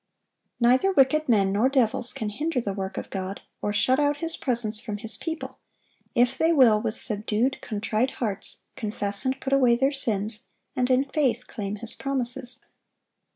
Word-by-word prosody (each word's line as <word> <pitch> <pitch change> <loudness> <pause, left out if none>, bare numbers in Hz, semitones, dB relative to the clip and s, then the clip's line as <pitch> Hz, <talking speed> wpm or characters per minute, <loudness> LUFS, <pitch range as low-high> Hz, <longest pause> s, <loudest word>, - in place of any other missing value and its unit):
Neither 255 +10 +4
wicked 305 0 +3
men 200 -4 +3
nor 215 +6 +3
devils 245 -3 +1
can 215 - -3
hinder 295 +6 -2
the 205 -5 -3
work 190 -1 -5
of - - -6
God, 190 0 -4 0.2
or 205 - -1
shut 255 +6 +2
out 290 0 +2
His 330 +2 -1
presence 235 -8 0
from 210 -3 -4
His 215 0 +1
people, 320 +8 -5 0.6
if 245 +2 +2
they 325 +1 +4
will, 240 -9 +5
with 215 - -2
subdued, 215 +5 0
contrite 220 +3 -1
hearts, 215 -4 -3
confess 210 -2 -3
and 260 +1 0
put 270 0 -2
away 255 -3 +5
their 270 +3 +2
sins, 220 -4 0 0.3
and 250 0 +1
in 255 +1 +4
faith 260 -4 0
claim 205 -4 -5
His 225 +2 -5
promises. 255 -2 -3
240 Hz, 170 wpm, -25 LUFS, 210-270 Hz, 0.6 s, will